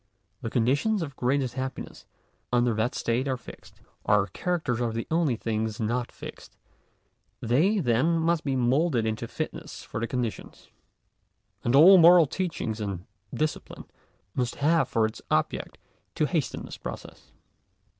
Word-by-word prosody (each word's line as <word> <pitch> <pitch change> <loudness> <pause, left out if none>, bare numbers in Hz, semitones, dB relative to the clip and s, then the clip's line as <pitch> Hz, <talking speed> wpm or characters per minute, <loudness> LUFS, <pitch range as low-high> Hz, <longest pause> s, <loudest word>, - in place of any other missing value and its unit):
The 115 - -3
conditions 145 - +1
of 140 -4 -7
greatest 130 0 0
happiness 130 0 -6 0.4
under 120 -1 +3
that 110 +3 -1
state 120 +4 -1
are 130 -1 0
fixed. - - -14 0.2
Our 105 -1 +3
characters 150 - -2
are 120 -1 0
the 115 +1 -3
only 160 -6 +2
things 110 -1 -3
not 120 +2 -1
fixed. - - -11 0.8
They, 155 - +2
then, 150 - +2
must 165 0 +1
be 135 -2 -1
moulded 130 0 +2
into 110 +1 -2
fitness 155 +3 -6
for - - -6
the 115 - -2
conditions. 120 -3 -5 0.9
And 120 - +2
all 180 +6 +9
moral 170 0 +8
teaching 145 - -3
and 100 -3 -4 0.3
discipline, 155 0 -3 0.5
must 125 -2 -1
have 160 +4 +2
for 110 -1 +2
its 110 - -5
object, - - -1 0.4
to - - +2
hasten - - -2
this - - -9
process. - - -9
125 Hz, 145 wpm, -27 LUFS, 115-160 Hz, 0.9 s, all